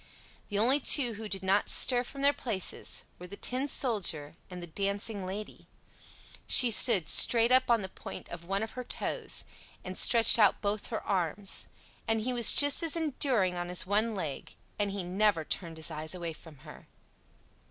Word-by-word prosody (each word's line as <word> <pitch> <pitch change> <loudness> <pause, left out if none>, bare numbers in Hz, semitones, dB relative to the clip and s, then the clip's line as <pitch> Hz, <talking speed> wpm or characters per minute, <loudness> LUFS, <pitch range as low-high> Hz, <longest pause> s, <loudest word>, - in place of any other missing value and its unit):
The 205 - -4
only 250 +7 +3
two 255 -3 +4
who 215 0 -9
did 195 -1 -6
not 195 +2 +1
stir 245 -1 +4
from 275 +3 -10
their 285 +1 +4
places 225 -9 -2 0.2
were 180 - -10
the 200 - -11
Tin 260 +3 -3
Soldier 180 - +1
and 180 -1 -9
the 175 - -8
Dancing 200 +3 -4
Lady; 205 +3 -8 0.8
she 245 -3 +7
stood 205 - +3
straight 235 0 +4
up 255 0 +3
on 230 -3 +2
the - - -5
point - - -10
of 175 -1 -9
one 195 +4 -3
of 220 - -6
her 250 - -7
toes, - - -3 0.4
and 185 0 -8
stretched 230 +2 +5
out 210 -2 +3
both 205 0 -4
her 225 - -6
arms: 190 +1 -3 0.4
and 225 0 0
he 250 +3 -3
was 235 -2 +5
just 285 0 +3
as 330 -1 0
enduring 265 - 0
on 175 0 -6
his 180 0 -3
one 215 +3 -1
leg; 155 -8 -7 0.2
and 205 -1 0
he 195 -1 -5
never 185 -2 0
turned 165 -1 -4
his 160 +1 -5
eyes 155 +2 -6
away 170 -2 -6
from 155 -1 -15
her. - - -14
205 Hz, 185 wpm, -29 LUFS, 180-235 Hz, 0.8 s, she